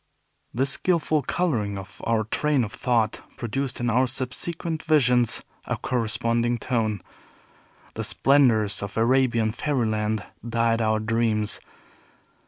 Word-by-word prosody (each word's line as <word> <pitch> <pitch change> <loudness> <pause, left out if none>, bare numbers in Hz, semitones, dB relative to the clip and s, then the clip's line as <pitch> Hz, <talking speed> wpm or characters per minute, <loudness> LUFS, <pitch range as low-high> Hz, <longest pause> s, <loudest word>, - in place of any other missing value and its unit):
This 135 +3 +1
skillful 155 -3 +1
coloring 120 - -1
of 95 -1 -10
our 115 -1 +1
train 140 +5 +1
of 105 - -5
thought 115 -4 0 0.2
produced 130 +3 -3
in 120 - -1
our 125 +3 +3
subsequent 155 +6 -3
visions 125 -7 +3 0.2
a - - -2
corresponding 115 0 0
tone. 110 -4 -1 0.9
The - - -4
splendors 120 -7 +3
of 100 +1 -6
Arabian 120 -2 +2
fairyland 110 -5 -1 0.2
dyed 115 0 +1
our 110 -1 +2
dreams. 110 -1 +1
120 Hz, 115 wpm, -25 LUFS, 110-135 Hz, 0.9 s, our